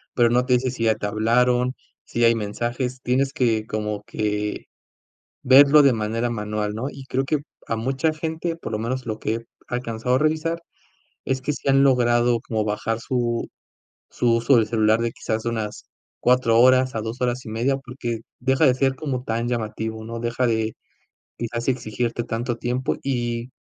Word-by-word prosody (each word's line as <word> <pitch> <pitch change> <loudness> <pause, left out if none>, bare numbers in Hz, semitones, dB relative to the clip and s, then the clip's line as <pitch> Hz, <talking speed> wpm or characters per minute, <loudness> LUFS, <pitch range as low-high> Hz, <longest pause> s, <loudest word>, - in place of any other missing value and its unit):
pero 120 -1 +4
no 125 +1 +3
te 125 - +3
dice 125 0 +2
si 115 -3 -2
ya 110 -1 +4
te 110 - -5
hablaron, 125 +4 +2 0.3
si 120 - -1
hay 115 - +6
mensajes, 120 +4 -3
tienes 135 +2 +1
que 115 -4 +1
como 105 -1 -3
que 105 -1 -2 0.8
verlo 140 +3 +7
de 140 -2 +5
manera 115 +2 -1
manual, 105 -1 -3
¿no? 120 +4 -3
Y 135 -1 -10
creo 135 +1 0
que 155 +1 0 0.3
a 115 - -1
mucha 135 +7 0
gente, 160 +2 -3
por 165 - -7
lo 110 - -1
menos 120 +3 -3
lo 110 0 -2
que 110 - -2
he 115 0 -7 0.2
alcanzado 120 0 -2
a 130 - +2
revisar, 160 +2 0 0.7
es 130 -1 -1
que 150 - -1
sí 145 - -5
han 135 0 +5
logrado 120 -2 +3
como 110 -2 -2
bajar 110 +2 -1
su 120 -1 -1 0.6
su 120 -1 +1
uso 120 +2 +4
del 110 -1 +3
celular 110 -1 +3
de 115 - 0
quizás 110 0 -3
unas 110 -3 -3 0.3
4 120 -2 +3
horas 130 +1 +5
a 110 - -1
2 115 +3 -6
horas 125 0 -1
y - - -7
1/2, 120 +5 0
porque 125 -3 -5 0.2
deja 130 +4 +2
de 125 -3 +5
ser 135 0 +1
como 130 -4 -3
tan 115 0 -2
llamativo, 110 -1 -3
¿no? 115 +1 -6
Deja 120 +2 0
de 110 -1 0 0.6
quizás 115 0 -4
exigirte 120 -1 -1
tanto 120 +1 -3
tiempo. 125 +2 -1
Y 120 -2 -2
120 Hz, 185 wpm, -23 LUFS, 110-130 Hz, 0.8 s, verlo